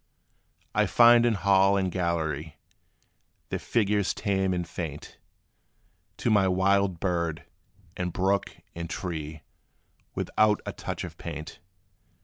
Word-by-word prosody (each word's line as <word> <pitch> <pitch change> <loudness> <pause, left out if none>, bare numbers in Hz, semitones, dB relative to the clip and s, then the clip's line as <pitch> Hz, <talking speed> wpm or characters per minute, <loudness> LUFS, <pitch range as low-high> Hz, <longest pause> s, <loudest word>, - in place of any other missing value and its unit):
I - - +2
find 120 0 +6
in 115 - +2
hall 100 0 +4
and 95 -2 0
gallery, 80 -4 -2 0.9
Their - - -2
figures 105 -3 0
tame 95 -2 0
and 90 -2 -2
faint, 80 -4 -7 1.0
To 115 - 0
my 100 -3 +4
wild 95 -1 +2
bird, 85 -4 -2 0.5
and 90 -1 -3
brook, 95 +3 0 0.2
and 85 0 -6
tree, 80 -5 -5 0.7
Without 105 -1 +2
a - - -4
touch - - -5
of - - -9
paint. 75 -2 -7
95 Hz, 120 wpm, -27 LUFS, 85-100 Hz, 1.0 s, find